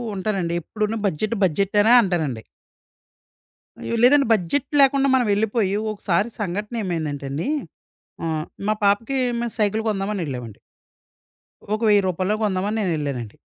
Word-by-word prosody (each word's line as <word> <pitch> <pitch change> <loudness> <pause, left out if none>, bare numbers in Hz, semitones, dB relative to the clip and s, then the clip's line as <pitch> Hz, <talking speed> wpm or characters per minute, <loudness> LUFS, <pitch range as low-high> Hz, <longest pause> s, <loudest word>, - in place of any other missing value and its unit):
ఉంటానండి. 190 -3 -2
ఎప్పుడు‌ను 215 +5 -3
budget 205 +6 -1
budget 190 +4 +1
అనే 225 +3 +5
అంటానండి. 160 - -1 1.4
అయ్యో! 235 - -3
లేదంటే 280 +2 +6
బడ్జెట్ 220 +8 0
లేకుండా 275 0 +4
మనమెళ్ళిపోయి 210 -3 +1 0.2
ఒకసారి 200 +2 0
సంఘటన 205 +4 -3
ఏమైందంటేండి 155 - -3 0.8
ఆహ్, 160 -1 -2 0.2
మా - - +4
పాపకి 220 +7 +1 0.2
మేము 235 -1 -3
సైకిల్ 215 +1 +1
కొందామని 195 -1 -2
ఎళ్ళామండి. 125 -5 -7 1.1
ఒక 215 - -2
1000 205 -1 +5
రూపాయల్లో 185 +3 0
కొందామని 205 +2 -1
నేను 180 -4 0
ఎళ్ళానండి. 130 -7 -4
200 Hz, 120 wpm, -22 LUFS, 170-215 Hz, 1.4 s, లేదంటే